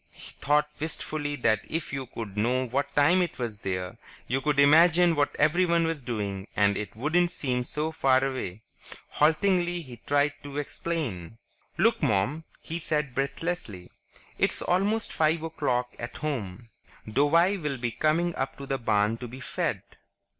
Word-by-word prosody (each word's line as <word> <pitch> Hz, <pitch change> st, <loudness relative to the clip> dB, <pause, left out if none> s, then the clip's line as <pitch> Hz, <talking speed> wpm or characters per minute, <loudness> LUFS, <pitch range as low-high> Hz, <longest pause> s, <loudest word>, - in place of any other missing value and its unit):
He -, -, -13 dB
thought 150 Hz, +1 st, +3 dB
wistfully 150 Hz, -1 st, -3 dB
that 115 Hz, -5 st, +2 dB
if 160 Hz, -3 st, -3 dB
you 135 Hz, -2 st, -3 dB
could 110 Hz, -4 st, -7 dB
know 125 Hz, +5 st, +1 dB
what 135 Hz, +4 st, -2 dB
time 165 Hz, +6 st, +5 dB
it 175 Hz, -3 st, -2 dB
was 115 Hz, -5 st, -4 dB
there, 90 Hz, -2 st, -4 dB, 0.3 s
you 130 Hz, +2 st, -1 dB
could 150 Hz, 0 st, +1 dB
imagine 165 Hz, +4 st, +6 dB
what 145 Hz, -1 st, +1 dB
everyone 170 Hz, +2 st, +3 dB
was 165 Hz, -3 st, -2 dB
doing 105 Hz, -5 st, -4 dB
and 100 Hz, -1 st, +3 dB
it 100 Hz, -1 st, -5 dB
wouldn't 160 Hz, +9 st, +2 dB
seem 125 Hz, -7 st, -1 dB
so 150 Hz, +5 st, -2 dB
far 135 Hz, -4 st, +3 dB
away. 110 Hz, -7 st, -4 dB, 0.5 s
Haltingly, 175 Hz, +2 st, +2 dB
he 125 Hz, -4 st, -11 dB
tried 145 Hz, +1 st, +2 dB
to 145 Hz, 0 st, -8 dB
explain. 135 Hz, -, -4 dB, 0.4 s
"Look, 230 Hz, +1 st, +3 dB
Mom," 110 Hz, +11 st, +1 dB, 0.2 s
he 165 Hz, +1 st, -4 dB
said 150 Hz, -4 st, -1 dB
breathlessly. 135 Hz, -, -3 dB, 0.5 s
"It's -, -, +2 dB
almost 205 Hz, +5 st, +1 dB
five 160 Hz, +1 st, +2 dB
o'clock 125 Hz, -6 st, -1 dB
at 120 Hz, 0 st, -6 dB
home. 115 Hz, -7 st, -4 dB, 0.4 s
Douwie 165 Hz, -, +3 dB
will 145 Hz, -3 st, -2 dB
be 120 Hz, -1 st, -2 dB
coming 165 Hz, +7 st, +1 dB
up 135 Hz, -, -3 dB
to 140 Hz, -, -7 dB
the 135 Hz, 0 st, -2 dB
barn 110 Hz, -1 st, +1 dB
to 125 Hz, -, -7 dB
be 125 Hz, +3 st, -10 dB
fed. -, -, -2 dB
140 Hz, 160 wpm, -27 LUFS, 120-160 Hz, 0.5 s, imagine